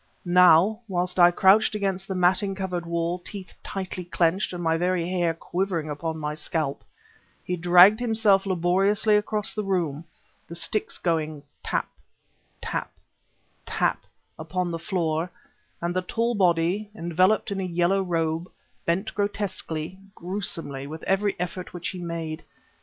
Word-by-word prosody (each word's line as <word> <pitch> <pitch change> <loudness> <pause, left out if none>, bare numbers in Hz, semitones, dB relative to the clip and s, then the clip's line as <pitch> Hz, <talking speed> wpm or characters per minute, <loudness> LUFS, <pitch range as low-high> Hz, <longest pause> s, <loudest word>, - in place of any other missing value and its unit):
Now, 180 +4 +6
whilst 180 -1 -1
I 175 0 +9
crouched 195 +4 +4
against 195 -2 -2
the 190 - -3
matting 185 +2 +2
covered 180 -3 -3
wall, 170 +1 -1
teeth 190 +1 -8
tightly 185 -1 -5
clenched 175 +2 +1
and 175 -1 -5
my 165 0 +2
very 175 0 0
hair 175 -2 0
quivering 170 -3 -2
upon 160 +2 -3
my 150 -1 -3
scalp, 155 -2 -2 0.6
he 180 - -2
dragged 180 +5 +7
himself 220 -5 +3
laboriously 195 +4 +2
across 210 0 0
the 215 - -2
room, 170 -6 -1 0.4
the 170 - -8
sticks 205 +5 -1
going 155 -4 -1 0.2
tap - - -1 0.8
tap - - -3 0.7
tap - - -1 0.3
upon 175 +2 -2
the 165 - -3
floor, 170 -2 -1 0.5
and 175 +1 -1
the 185 - +1
tall 230 +6 -1
body, 185 +1 +1
enveloped 185 +4 +2
in 195 - -2
a - - -1
yellow 175 +2 +1
robe, 165 -1 -1 0.4
bent 180 +6 0
grotesquely, 190 -4 -2 0.2
gruesomely, 165 -7 -3
with 155 +2 -8
every 195 +1 0
effort 180 +1 -5
which 175 -1 -3
he 185 - -6
made. 165 -2 -5
180 Hz, 140 wpm, -25 LUFS, 165-195 Hz, 0.8 s, I